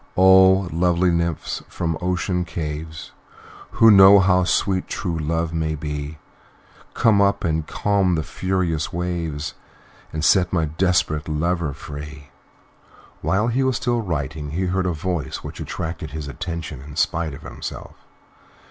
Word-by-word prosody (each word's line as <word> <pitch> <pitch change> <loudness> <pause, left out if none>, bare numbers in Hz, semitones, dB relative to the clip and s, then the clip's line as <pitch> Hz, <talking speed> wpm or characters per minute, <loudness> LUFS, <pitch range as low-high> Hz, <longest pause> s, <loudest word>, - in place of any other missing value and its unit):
"O! 95 0 +6
lovely 90 +1 +2
Nymphs, 85 -1 -2
from 80 -2 -2
ocean 90 0 -1
caves, 80 -2 -6 0.6
Who 115 -1 +6
know 100 0 +9
how 90 -1 +3
sweet 95 0 0
true 85 -4 -3
love 80 +2 -1
may 80 -1 -1
be, 75 0 -5 0.8
Come 110 -4 +4
up 100 0 +2
and 80 -1 -1
calm 100 -3 +1
the 80 - -1
furious 90 -3 -2
waves 85 -4 -3 0.6
And 80 0 -2
set 90 -3 +4
a 80 -3 +2
desperate 80 -1 0
lover 85 0 -1
free!" 75 +1 -9 0.9
While 105 +5 +1
he 125 +3 0
was 130 -1 +1
still 120 -1 0
writing 75 -5 -4
he 90 +6 -2
heard 90 0 0
a - - +1
voice 85 -2 -3
which - - -8
attracted 80 -1 -5
his 75 -1 -6
attention 75 0 -6
in 70 +1 -11
spite 80 -1 0
of - - -13
himself. - - -8
85 Hz, 140 wpm, -22 LUFS, 75-95 Hz, 0.9 s, know